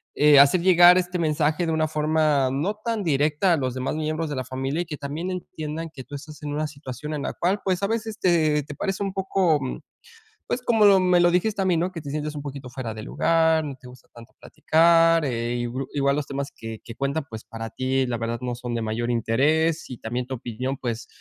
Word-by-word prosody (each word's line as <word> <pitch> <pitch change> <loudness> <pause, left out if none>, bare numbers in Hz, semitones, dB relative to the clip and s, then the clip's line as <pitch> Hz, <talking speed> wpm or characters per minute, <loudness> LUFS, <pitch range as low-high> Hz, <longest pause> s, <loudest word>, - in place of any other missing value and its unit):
eh, 150 -1 +6
hacer 145 +5 +6
llegar 175 0 +7
este 180 0 -1
mensaje 155 +1 +1
de 165 - 0
una 155 0 +1
forma 150 -3 +1
no 155 +11 -1
tan 225 -2 -1
directa 150 +3 +2
a - - +2
los 130 -3 -2
demás 130 +2 -2
miembros 155 +1 -2
de 145 - -3
la 130 - -2
familia 135 +5 -2
y 175 - -3
que 150 -3 -6
también 150 +6 -4
entiendan 165 -3 -5
que 130 - -9
tú 145 +4 -9
estás 150 +2 -10
en 145 -1 -4
una 155 +1 -1
situación 140 0 -7
en 145 -2 -3
la - - -3
cual 190 +4 0
pues, 185 0 0
a 200 - +2
veces 220 -1 -3
te 155 -4 +2
te 145 - -9
parece 195 +5 -2
un 195 -1 -3
poco, 190 -5 +1 0.9
pues, 250 - -1
como 210 -5 +5
me 180 -1 +3
lo 175 0 +5
dijiste 185 +5 +1
también, 185 -3 +2
no 180 +2 -1
que 165 - -6
te 145 -2 -7
sientes 150 0 -3
un 145 - -6
poquito 140 -2 -7
fuera 125 -3 -5
de 110 - -7
lugar, 160 -1 +2
no 140 -3 -6
te 130 -1 -16
gusta 125 0 -16
tanto 120 +1 -14
platicar, 165 0 +3
eh, 120 -2 -2 0.4
igual 140 -1 +2
los 150 -1 -2
temas 140 0 -4
que 115 -1 -8
que 115 - -9
cuentan, 140 +2 -2
pues, 110 -1 -8
para 115 0 -7
ti, 130 0 0
la 120 -1 -2
verdad 115 0 -3
no 125 -1 -2
son 120 -1 -5
de 115 - -2
mayor 110 +2 -2
interés 150 +8 +1
y 125 - -7
también 120 +2 -4
tu 130 - -4
opinión 125 +3 -4
pues, 120 -1 -4
150 Hz, 230 wpm, -24 LUFS, 130-170 Hz, 0.9 s, llegar